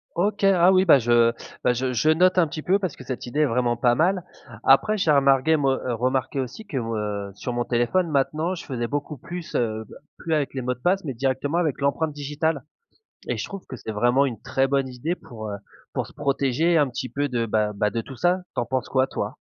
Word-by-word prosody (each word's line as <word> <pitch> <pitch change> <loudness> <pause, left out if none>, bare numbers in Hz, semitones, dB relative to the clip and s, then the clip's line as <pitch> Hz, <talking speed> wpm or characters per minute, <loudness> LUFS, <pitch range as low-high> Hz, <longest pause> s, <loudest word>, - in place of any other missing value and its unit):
OK. 200 +4 0
Ah 185 -2 +5
oui, 185 0 +5
bah 155 -6 +7
je, 120 -1 +4 0.3
bah, 125 - +3
je 125 +1 -1
je 125 +6 +2
note 180 +4 +4
un 175 -3 +5
petit 155 +1 -6
peu, 190 +5 +2
parce 185 -7 -3
que - - -11
cette 130 -1 -5
idée 140 +5 -1
est - - +5
vraiment 120 -2 +1
pas 120 0 +3
mal. 180 +4 +2 0.4
Après 210 +11 +4
j'ai 170 -6 +2
remarqué, 140 +2 +4
moi 135 -3 +1
heu, 125 - -1
remarqué 130 +3 -1
aussi 130 - -7
que, 145 - -4
heu, 105 -4 -3
sur 125 +4 -4
mon 120 0 0
téléphone, 120 +10 +1
maintenant, 155 +4 0
je 170 - -9
faisais 120 -4 -3
beaucoup 145 +2 -4
plus, 170 +5 -8
heu, 110 -2 -1 0.3
plus 165 - -3
avec 150 -3 0
les 135 - -3
mots 125 0 -1
de 125 - -17
passe 190 +8 +1
mais 135 - -3
directement 135 +5 -1
avec 155 -6 0
l'empreinte 145 +3 0
digitale. 145 0 -2 0.6
Et - - -1
je - - -3
trouve 195 -2 -9
que 130 - -7
c'est 110 - -6
vraiment 120 +6 +3
une 120 -5 -4
très 135 0 +1
bonne 135 -1 +1
idée 130 +7 -3
pour, 110 -9 -9
heu, 100 - -4 0.4
pour - - -1
se - - -15
protéger 145 +3 +1
un 145 -2 +4
petit 130 0 -5
peu 145 0 -1
de, 120 -2 -1
bah 105 -1 +1
bah, 105 +1 +1
de 115 +3 -2
tout 135 - -10
ça. 180 +7 +1
Tu - - +1
en - - -2
penses 130 +1 -2
quoi, 130 0 +2
toi? - - -4
135 Hz, 240 wpm, -24 LUFS, 120-160 Hz, 0.6 s, bah